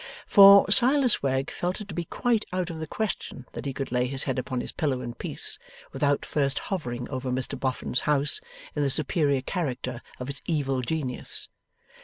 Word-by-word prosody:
For, 200 -1 +9
Silas 260 +2 +5
Wegg 135 0 0
felt 180 +1 -3
it 210 - -8
to - - -6
be 175 -1 -3
quite 230 +4 0
out 180 -1 -2
of 160 - -7
the 160 - -5
question 200 - -4
that - - -6
he - - -1
could 135 -1 -5
lay 125 0 +1
his 135 +1 -3
head 130 -2 -1
upon 130 0 -3
his - - -4
pillow 140 -6 -1
in 120 -1 -5
peace, - - -1 0.3
without 145 -1 0
first 140 -2 0
hovering 125 -11 -4
over 130 -1 -3
Mr 125 0 -2
Boffin's 130 -1 -1
house 150 0 +2 0.3
in 150 - 0
the 140 - +2
superior 140 -1 +2
character 130 -7 -3 0.2
of 125 - -5
its 140 0 -5
Evil 135 -5 0
Genius. 130 -1 -3
140 Hz, 190 wpm, -26 LUFS, 130-175 Hz, 0.3 s, For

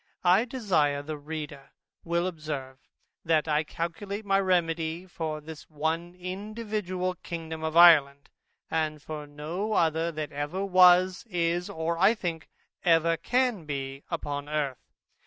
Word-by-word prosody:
I 185 +6 +5
desire 170 - 0
the 155 +1 -5
reader 150 -2 -7 0.3
will 170 +1 0
observe, 150 -6 -5 0.4
that 160 -1 +2
I 150 0 +2
calculate 195 +7 -5
my 195 -1 +3
remedy 170 -2 0
for 160 -4 -4
this 155 0 -11
one 160 +3 -2
individual 190 0 -3
Kingdom 160 -2 -6
of 160 +1 -1
Ireland, 145 -5 +6 0.4
and 155 -1 -1
for 150 0 -7
no 165 +9 -4
other 165 -2 +2
that 155 -2 -5
ever 145 +7 -3
was, 185 0 +5
is, 175 -1 0
or, 165 +1 -2
I 200 +5 +5
think, 170 -6 -4 0.3
ever 165 -1 +4
can 240 - 0
be 135 -2 -4
upon 145 -3 -4
Earth. 145 -4 -3
165 Hz, 135 wpm, -28 LUFS, 150-185 Hz, 0.4 s, Ireland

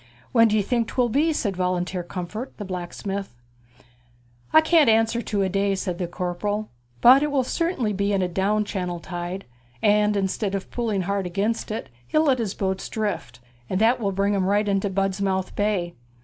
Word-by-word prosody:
'When 230 -2 +6
d'ye 215 -1 +2
think 230 +2 0
'twill 245 -2 +1
be?' 295 +8 +2
said 205 -10 -1
Volunteer 180 0 -1
Comfort, 180 +8 -6
the 205 - -5
blacksmith. 190 - -5 1.2
'I 315 - +7
can't 315 -4 +4
answer 225 +1 +3
to 205 -4 -1
a - - +1
day,' 195 +1 +1
said 185 -2 -3
the 180 - -1
corporal, 185 +5 -3 0.3
'but 260 +3 +8
it 300 - +1
will 280 -2 +1
certainly 265 - -1
be 200 +1 0
in 195 -2 +1
a - - +1
down 200 +4 0
channel 180 -4 -3
tide; 175 +2 -5 0.3
and 210 - +3
instead 195 +1 -1
of 195 - -5
pulling 225 -5 -1
hard 200 0 -1
against 200 +6 -1
it, 220 - -4 0.2
he'll 310 - +2
let 270 -5 +3
his 210 -4 -2
boats 190 -1 -2
drift, 205 - -3 0.3
and 185 - 0
that 230 +4 +4
will 200 -4 0
bring 200 +2 +1
'em 195 -2 +1
right 205 +1 +2
into 195 0 +1
Budmouth 195 -1 -1
Bay. 200 -5 0
200 Hz, 185 wpm, -24 LUFS, 190-225 Hz, 1.2 s, but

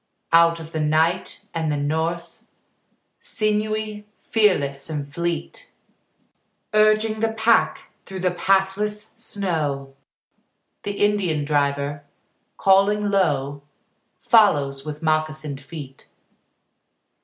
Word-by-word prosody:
Out 170 0 +5
of 160 0 -10
the 160 - -3
night 160 +4 0
and 160 -2 -1
the 145 - -1
north, 160 +4 -2 0.8
Sinewy, 215 0 -2
fearless 145 -11 +1
and 145 -2 -5
fleet, 170 0 -4 1.0
Urging 215 +1 +3
the 225 0 0
pack 225 +1 +2
through 190 -1 -7
the 180 0 +1
pathless 195 +3 0
snow, 150 -9 -3 0.9
The 205 - -3
Indian 180 -8 0
driver, 145 0 0 0.5
calling 200 +2 +3
low, 145 -7 0 0.6
Follows 145 - +3
with 150 +1 -7
moccasined 155 -2 -1
feet. 140 -2 -10
170 Hz, 95 wpm, -22 LUFS, 145-210 Hz, 1.0 s, Out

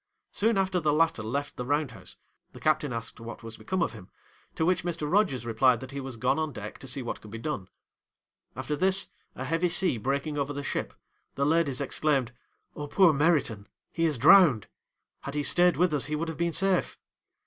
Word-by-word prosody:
Soon 220 +1 +1
after 190 -1 +1
the 155 -3 +1
latter 160 -4 +2
left 140 +7 -4
the 125 - -3
round 145 +1 0
house, 95 -5 -9 0.4
the - - -11
captain 155 -2 +1
asked 115 -1 -5
what 115 0 -9
was 115 0 -8
become 185 -1 -1
of - - -1
him, 100 -5 -12 0.5
to 160 - 0
which 180 -1 +1
Mr. 170 -3 -3
Rogers 150 - +1
replied, 120 +1 +3
that 130 - -9
he 140 - -5
was 130 -3 -7
gone 125 +6 +1
on 155 -1 -1
deck 105 -4 -8
to 135 - -10
see 130 +1 -2
what 120 - -5
could 105 - -12
be 110 - -7
done. 110 -6 -4 0.9
After 150 - -3
this, 190 +5 +1 0.3
a 130 - -5
heavy 165 +5 +1
sea 175 -7 +2
breaking 140 +5 -2
over 140 +1 -2
the 145 0 -5
ship, - - -3 0.4
the 140 - 0
ladies 150 -4 +2
exclaimed, 140 -3 0 0.4
"Oh, 145 - -5
poor 175 +1 +5
Meriton! 140 -9 +1 0.2
he 165 - 0
is 155 -4 0
drowned; 140 - +6 0.5
had 140 +1 -7
he 145 - 0
stayed 175 +3 +3
with 180 -2 +2
us 145 -3 +1
he 150 +2 -2
would 165 +2 -2
have 160 - -5
been 170 0 0
safe!" 195 +1 +1
145 Hz, 210 wpm, -28 LUFS, 125-165 Hz, 0.9 s, drowned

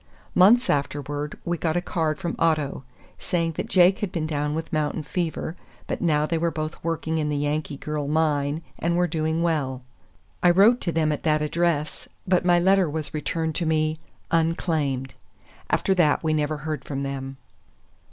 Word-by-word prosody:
Months 235 +7 +6
afterward 145 +1 -2
we 175 -1 -1
got 165 0 0
a - - +3
card 160 -3 -1
from 170 -4 -3
Otto, 155 -5 +1 0.4
saying 170 -2 -1
that 160 - -5
Jake 185 +1 +5
had 205 -4 -2
been 160 -3 -2
down 150 -1 -1
with 160 0 -5
mountain 155 0 -1
fever, 165 -1 -3 0.3
but - - -4
now 150 -3 +2
they 165 +1 -1
were 170 +1 +1
both 155 -1 -5
working 160 -1 -1
in 150 -1 -1
the 145 - -1
Yankee 145 0 -2
Girl 150 0 -3
mine, 150 0 +1 0.2
and 170 +1 0
were 180 - +3
doing 160 -1 -1
well. 135 -6 -1 0.6
I 175 - +5
wrote 205 +8 +5
to 170 - -1
them 160 -2 +1
at 150 - -2
that 155 -1 +2
address, 155 -1 -1 0.2
but 180 -1 +3
my 175 -1 +4
letter 190 -1 +3
was 155 0 -3
returned 160 +1 -2
to 170 - -1
me, 155 0 +1 0.3
"unclaimed." 160 -5 0 0.6
After 190 - +2
that 170 -5 +3
we 155 -1 +1
never 150 0 0
heard 150 -2 -4
from 140 -1 -4
them. 135 -1 -5
155 Hz, 180 wpm, -24 LUFS, 150-170 Hz, 0.6 s, Months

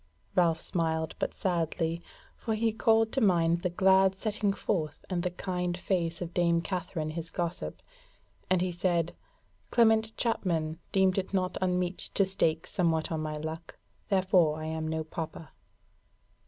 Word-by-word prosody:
Ralph 170 -3 +3
smiled, 160 -2 -1
but - - -1
sadly, 170 -2 -1 0.3
for 220 -2 -2
he 225 +1 +1
called 225 0 +3
to 270 - 0
mind 170 -4 +3
the 180 - 0
glad 190 +1 +4
setting 210 -1 0
forth 165 -6 -2
and 175 -1 0
the 180 - 0
kind 180 -1 -3
face 175 -2 -1
of 175 0 -7
dame 170 -1 +2
Katherine 175 -4 -3
his 165 +1 -5
gossip, 170 0 -4 0.7
and 185 -1 +3
he 185 0 0
said: 175 -1 0 0.5
"Clement 220 -1 +3
Chapman 165 -8 0
deemed 190 -1 +3
it 195 +1 -4
not 185 -1 0
unmeet 180 0 0 0.2
to 195 - +4
stake 165 -4 +1
somewhat 165 -3 0
on 160 -1 -1
my 155 0 -3
luck, 160 +2 -6 0.3
therefore 185 -5 +3
I 155 - -5
am 160 0 -3
no 160 0 -1
pauper." 160 0 -6
175 Hz, 155 wpm, -29 LUFS, 165-190 Hz, 0.7 s, glad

